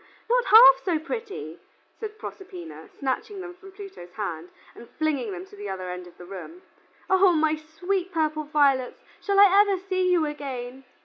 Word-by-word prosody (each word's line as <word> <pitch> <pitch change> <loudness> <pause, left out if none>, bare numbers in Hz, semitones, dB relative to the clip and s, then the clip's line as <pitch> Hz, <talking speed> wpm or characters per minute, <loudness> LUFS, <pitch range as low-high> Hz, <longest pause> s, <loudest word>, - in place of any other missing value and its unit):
not - - +2
half 270 - +8
so 350 -4 +1
pretty," 315 - -6 0.4
said 435 -1 -7
Proserpina, 370 -5 -9
snatching 280 +9 -4
them 355 -1 -7
from 385 +2 -15
Pluto's 380 - -11
hand, 175 -5 -5 0.2
and 235 - -14
flinging 285 -8 -1
them 180 -1 -7
to 200 - -16
the 205 0 -7
other 185 -1 -5
end 180 0 -7
of 175 - -17
the 175 - -11
room. 195 - -10 0.4
"O 380 -1 +5
my 315 -1 +2
sweet 355 +5 -3
purple 310 -2 -1
violets, 280 -4 +1 0.2
shall 400 -1 +1
I 400 0 +8
ever 400 -2 +1
see 370 -1 0
you 340 -3 +3
again?" 270 -3 -6
315 Hz, 175 wpm, -25 LUFS, 245-380 Hz, 0.4 s, half